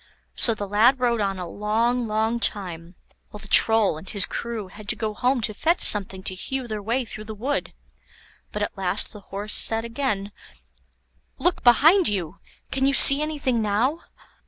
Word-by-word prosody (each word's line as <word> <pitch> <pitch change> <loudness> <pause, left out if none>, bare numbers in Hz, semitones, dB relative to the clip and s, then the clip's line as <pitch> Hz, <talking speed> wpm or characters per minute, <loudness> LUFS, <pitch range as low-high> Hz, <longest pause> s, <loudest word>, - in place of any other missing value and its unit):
So 230 - +3
the 205 -1 -6
lad 225 +7 +3
rode 240 -3 0
on 195 -1 -2
a 180 -1 -6
long, 230 +5 -1
long 220 +2 -1
time, 175 -6 -4 0.3
while - - -11
the 210 - -10
Troll 215 -7 +3
and 185 - -12
his 200 -3 +3
crew 230 -4 -6
had 205 +2 -14
to - - +2
go 215 -1 -4
home 250 +3 -1
to 215 - +1
fetch 330 - -1
something 195 -2 0
to 185 - -4
hew 260 +7 -5
their 215 -2 -5
way 235 +5 -2
through 215 -1 -9
the 215 0 -8
wood. 265 +7 -3 0.8
But 210 - -4
at - - -5
last 190 +2 0
the 210 - -11
Horse 200 +2 -7
said 225 0 0
again: 230 -5 -3 1.1
"Look 355 - -1
behind 315 - +5
you! 185 -3 -4 0.3
can 270 0 0
you 275 - +1
see 275 +1 +10
anything 285 -6 -2
now?" 225 +9 -1
220 Hz, 180 wpm, -23 LUFS, 200-245 Hz, 1.1 s, see